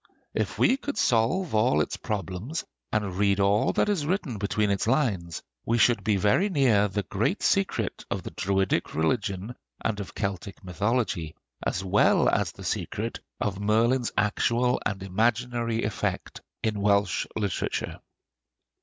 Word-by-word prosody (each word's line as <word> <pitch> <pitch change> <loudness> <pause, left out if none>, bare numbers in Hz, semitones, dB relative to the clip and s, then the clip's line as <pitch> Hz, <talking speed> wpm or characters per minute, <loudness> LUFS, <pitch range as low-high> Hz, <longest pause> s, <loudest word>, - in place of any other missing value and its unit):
If - - -2
we 260 - +4
could 285 +1 -5
solve 125 +10 +2
all 110 +4 +3
its - - 0
problems 105 - -4 0.3
and 105 -4 -1
read 100 0 +2
all 100 +1 +3
that - - +2
is 200 -7 +1
written 150 - -2
between 105 +1 +1
its 100 +2 0
lines, 105 - 0 0.2
we 115 - +1
should 120 +1 +4
be 105 -1 +2
very 105 - +3
near 125 - +3
the 105 +1 -2
great - - -1
secret - - 0
of - - -3
the - - -6
Druidic 95 0 0
religion 100 +6 -1 0.3
and 105 -2 0
of 100 - -7
Celtic 100 -2 -4
mythology, 95 -3 -1 0.3
as 95 - -1
well 95 +2 +4
as - - +1
the - - -12
secret - - -3 0.2
of 100 -1 -2
Merlin's 115 +4 +2
actual 115 +3 +2
and 100 -2 -4
imaginary 115 +3 0
effect 105 -1 -3 0.2
in 105 -2 -1
Welsh 100 0 +2
literature. 100 -4 -2
105 Hz, 145 wpm, -27 LUFS, 100-120 Hz, 0.3 s, we